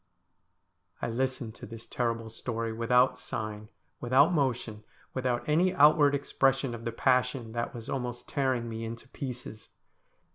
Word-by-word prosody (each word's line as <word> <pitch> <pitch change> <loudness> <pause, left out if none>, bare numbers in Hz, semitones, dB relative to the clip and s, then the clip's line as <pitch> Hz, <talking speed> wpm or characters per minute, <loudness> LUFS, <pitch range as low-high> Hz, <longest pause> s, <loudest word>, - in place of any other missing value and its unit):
I - - -2
listened 130 -2 -2
to - - -9
this 115 0 -9
terrible 115 -2 -2
story 115 0 -3
without 125 +3 +3
sign, 110 -3 -5 0.3
without 135 +8 +4
motion, 120 -7 -1 0.3
without 125 -2 -1
any 170 +5 +3
outward 145 -1 +6
expression 135 -2 +1
of 115 0 -7
the 115 - -1
passion 125 -1 +1
that 120 +1 -3
was 115 0 -8
almost 125 -3 -4
tearing 130 -4 0
me 115 0 -5
into 115 +3 -7
pieces. 125 -6 -7
120 Hz, 140 wpm, -29 LUFS, 115-135 Hz, 0.3 s, outward